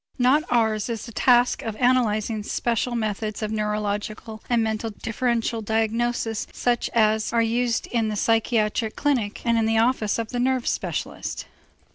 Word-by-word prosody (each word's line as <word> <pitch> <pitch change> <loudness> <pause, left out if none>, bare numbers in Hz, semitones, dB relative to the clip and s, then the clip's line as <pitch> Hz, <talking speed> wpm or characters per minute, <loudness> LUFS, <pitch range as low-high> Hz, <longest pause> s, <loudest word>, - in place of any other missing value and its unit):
Not 260 +4 +4
ours 220 -3 +1
is 230 -3 -4
the 235 - -9
task 245 +2 +3
of 225 -2 -4
analyzing 225 -3 +1
special 235 +3 -1
methods 215 -1 -2
of 215 - -2
neurological 210 +1 -3
and 235 -2 +3
mental 220 0 -2
differential 230 +1 -1
diagnosis 225 +1 -1
such 240 -1 0
as 215 -1 +3
are 230 0 +3
used 235 +1 0
in 230 -2 0
the 215 - -2
psychiatric 220 0 +1
clinic 245 -9 -1
and 235 -1 +3
in 220 - +1
the 225 0 +2
office 225 -2 +2
of 225 -1 -3
the 245 - -3
nerve 255 0 +1
specialist. - - -3
225 Hz, 155 wpm, -24 LUFS, 215-240 Hz, -, Not